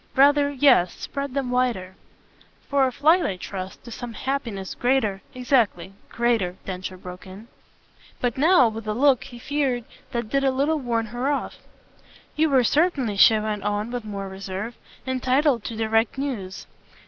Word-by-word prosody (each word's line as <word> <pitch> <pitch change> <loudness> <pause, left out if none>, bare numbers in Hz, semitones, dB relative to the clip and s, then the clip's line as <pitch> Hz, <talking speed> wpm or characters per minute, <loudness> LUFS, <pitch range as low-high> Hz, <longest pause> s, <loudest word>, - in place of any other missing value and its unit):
"Rather, 285 +1 +5
yes 265 -10 +4
spread 280 -1 -5
them 270 -3 -1
the - - -3
wider." 230 -8 0 0.7
"For 275 -1 +3
a - - -2
flight, 320 +7 +4
I 190 - -2
trust, 185 0 -7
to 235 - -11
some 235 +1 -7
happiness 230 -6 -3
greater 245 -6 0
!" - - -29
"Exactly. 240 -8 +1 0.2
Greater," 230 -7 0
Densher 185 0 -5
broke 180 +1 -10
in; 195 +5 -11 0.7
but 245 -2 -1
now 295 -2 +5
with 220 0 -6
a 210 - -1
look, 270 0 +3
he 245 -3 -11
feared, 265 -2 -1 0.3
that 235 -2 -3
did 275 0 +1
a 270 - +4
little 285 +4 +1
warn 235 -4 -1
her 250 +3 -1
off. 285 - -3 0.8
"You 315 +1 +2
were 265 -3 +4
certainly," 280 - +1
she 220 +3 +7
went 215 -1 -2
on 205 +3 -2
with 245 -2 -4
more 200 -2 -5
reserve, 195 +4 -6 0.3
"entitled 260 -1 +1
to 230 - -4
direct 225 +2 +1
news. 230 -10 -4
240 Hz, 170 wpm, -24 LUFS, 205-275 Hz, 0.8 s, she